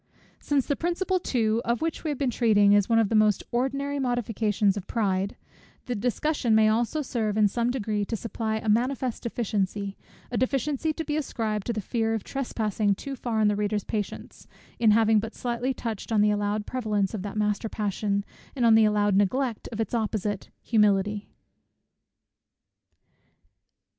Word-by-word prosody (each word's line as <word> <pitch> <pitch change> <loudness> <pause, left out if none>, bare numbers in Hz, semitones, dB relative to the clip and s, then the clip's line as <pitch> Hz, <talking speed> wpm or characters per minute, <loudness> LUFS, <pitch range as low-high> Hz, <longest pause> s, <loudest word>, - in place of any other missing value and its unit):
Since 285 -3 0
the 285 - 0
principle 365 +3 0
too, 225 -7 0
of 235 0 0
which 325 -1 -2
we 320 - -2
have 290 - -2
been 265 -2 0
treating, 205 -4 +4
is 205 0 +3
one 230 - +4
of 225 -3 +3
the - - -2
most 215 -2 +3
ordinary 275 +3 -1
modifications 220 -5 +1
of 200 -2 -6
pride; 195 -3 0 0.5
the 245 - -2
discussion 245 +2 0
may 215 0 +5
also 235 +7 0
serve 220 -5 -1
in 210 -1 +5
some 235 +4 0
degree 215 -4 -1
to 225 - -3
supply 220 0 -3
a 220 - -6
manifest 250 +3 +1
deficiency, 200 -4 -2 0.4
a 245 - -1
deficiency 275 +4 0
to 320 +1 -5
be 300 0 -1
ascribed 220 -8 -2
to - - +1
the 215 - -3
fear 225 +1 -1
of 220 - -4
trespassing 215 -6 -1
too 275 +7 -6
far 235 -3 -2
on 215 - +4
the 210 - +2
reader's 210 0 -1
patience, 210 -2 -5 0.3
in 230 -2 +4
having 220 0 +5
but 225 +2 -5
slightly 245 +1 -2
touched 230 -4 -5
on 215 -2 +3
the 210 0 +4
allowed 205 0 -1
prevalence 210 -6 -1
of 215 - -3
that 205 +2 -5
master 210 +1 0
passion, 200 -1 -1 0.3
and 250 -3 +1
on 230 - +6
the 220 0 +6
allowed 205 -1 +2
neglect 230 +4 0
of 225 - -6
its 225 - -2
opposite, 210 -3 -2
humility. 210 -2 +2
220 Hz, 175 wpm, -26 LUFS, 210-245 Hz, 0.5 s, on